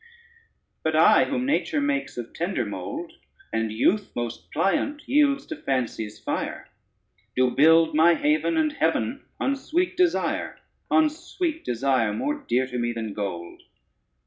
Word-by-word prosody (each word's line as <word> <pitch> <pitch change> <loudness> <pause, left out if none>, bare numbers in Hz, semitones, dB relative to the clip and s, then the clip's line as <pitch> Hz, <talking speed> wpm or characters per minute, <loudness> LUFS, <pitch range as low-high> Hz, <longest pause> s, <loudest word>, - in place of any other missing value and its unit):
But 160 0 0
I, 165 +7 +6
whom 255 -3 -2
nature 295 +2 0
makes 285 - -1
of 120 -1 -6
tender 170 -8 -2
mould, 305 - -6 0.4
And 110 -1 0
youth 190 - +1
most 120 -1 -5
pliant 285 - 0
yields 280 0 +3
to 315 - -6
fancy's 115 - -3
fire, - - -4 0.7
Do 130 0 +3
build 160 +4 +5
my 165 +3 +5
haven 305 - +1
and 310 -1 +2
heaven - - 0 0.2
on 275 - +1
sweet 345 +6 -1
desire, 360 -2 0 0.3
On 315 -1 +5
sweet 325 +1 -4
desire, 125 -3 +1
more 290 - -1
dear 130 - -1
to 125 -1 -5
me 120 0 -1
than 110 -3 -4
gold. 90 -5 -5
170 Hz, 145 wpm, -25 LUFS, -, 0.7 s, I